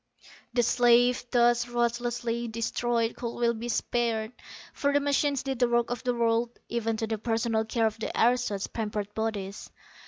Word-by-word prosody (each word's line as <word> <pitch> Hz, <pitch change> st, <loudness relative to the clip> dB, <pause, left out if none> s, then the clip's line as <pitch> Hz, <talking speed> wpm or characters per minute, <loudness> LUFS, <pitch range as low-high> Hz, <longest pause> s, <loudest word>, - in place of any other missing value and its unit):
_ -, -, +2 dB
_The -, -, +5 dB
slaves 245 Hz, +1 st, +4 dB
thus 240 Hz, -1 st, +3 dB
ruthlessly 240 Hz, 0 st, -1 dB
destroyed 230 Hz, +1 st, -1 dB
could 235 Hz, -1 st, -5 dB
well 235 Hz, -1 st, +2 dB
be 235 Hz, +1 st, -5 dB
spared, 230 Hz, -2 st, -1 dB, 0.4 s
for 285 Hz, -, 0 dB
the 285 Hz, -, +3 dB
machines 285 Hz, -1 st, +1 dB
did 265 Hz, -2 st, -3 dB
the 245 Hz, -1 st, +3 dB
work 240 Hz, 0 st, +1 dB
of 245 Hz, 0 st, -4 dB
the 245 Hz, -1 st, 0 dB
world, 235 Hz, 0 st, +1 dB
even 225 Hz, -1 st, -1 dB
to 225 Hz, -, -1 dB
the 220 Hz, -1 st, -3 dB
personal 225 Hz, 0 st, 0 dB
care 225 Hz, 0 st, 0 dB
of 220 Hz, 0 st, -1 dB
the -, -, -3 dB
aristos' 235 Hz, -4 st, +2 dB
pampered 210 Hz, -2 st, -4 dB
bodies. 210 Hz, -3 st, -4 dB
235 Hz, 175 wpm, -28 LUFS, 225-240 Hz, 0.4 s, The